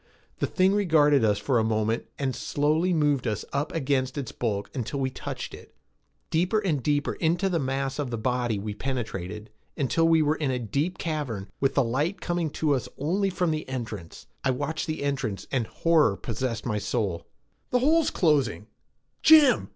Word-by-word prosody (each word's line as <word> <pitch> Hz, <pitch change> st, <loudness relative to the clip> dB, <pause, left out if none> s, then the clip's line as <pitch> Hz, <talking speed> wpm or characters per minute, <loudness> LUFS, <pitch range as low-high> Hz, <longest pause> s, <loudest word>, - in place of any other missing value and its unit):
The -, -, +1 dB
thing 190 Hz, +1 st, +3 dB
regarded 155 Hz, -, +4 dB
us 105 Hz, -2 st, +3 dB
for 125 Hz, 0 st, +1 dB
a -, -, +2 dB
moment 110 Hz, 0 st, 0 dB
and 135 Hz, -3 st, -1 dB
slowly 155 Hz, +8 st, +1 dB
moved 145 Hz, -7 st, +2 dB
us 105 Hz, -2 st, -2 dB
up 145 Hz, +2 st, -1 dB
against 135 Hz, -3 st, 0 dB
its 135 Hz, -5 st, -4 dB
bulk 105 Hz, -4 st, -3 dB
until 130 Hz, +2 st, -3 dB
we 130 Hz, -1 st, 0 dB
touched -, -, -6 dB
it. -, -, -13 dB, 0.6 s
Deeper 180 Hz, +7 st, +2 dB
and 175 Hz, -10 st, 0 dB
deeper 145 Hz, +2 st, 0 dB
into 175 Hz, +4 st, +1 dB
the 170 Hz, -3 st, 0 dB
mass 135 Hz, 0 st, -2 dB
of 145 Hz, -3 st, -2 dB
the 115 Hz, -, -3 dB
body 120 Hz, -1 st, 0 dB
we 105 Hz, +1 st, -4 dB
penetrated 105 Hz, -5 st, -4 dB, 0.3 s
until 145 Hz, +5 st, +2 dB
we 165 Hz, -1 st, +5 dB
were 150 Hz, +1 st, +1 dB
in 150 Hz, -4 st, -1 dB
a 130 Hz, -, 0 dB
deep 140 Hz, -, -2 dB
cavern 145 Hz, -, -3 dB
with 135 Hz, 0 st, +1 dB
the 140 Hz, -, +4 dB
light 145 Hz, +11 st, -1 dB
coming 175 Hz, -2 st, -1 dB
to 150 Hz, 0 st, 0 dB
us 130 Hz, -, -2 dB
only 190 Hz, +8 st, 0 dB
from 180 Hz, -2 st, 0 dB
the 155 Hz, -3 st, -3 dB
entrance. 110 Hz, -9 st, -6 dB, 0.2 s
I 135 Hz, -, +1 dB
watched 145 Hz, +5 st, -2 dB
the 155 Hz, -2 st, -3 dB
entrance 135 Hz, -8 st, -2 dB
and 125 Hz, -5 st, 0 dB
horror 155 Hz, -12 st, +3 dB
possessed 115 Hz, 0 st, -3 dB
my 105 Hz, -4 st, -1 dB
soul. 100 Hz, -6 st, -2 dB, 0.4 s
"The 250 Hz, -, +2 dB
hole's 310 Hz, +5 st, +3 dB
closing. 145 Hz, -, +1 dB, 0.6 s
Jim!" 305 Hz, -5 st, +6 dB
140 Hz, 180 wpm, -26 LUFS, 115-160 Hz, 0.6 s, Jim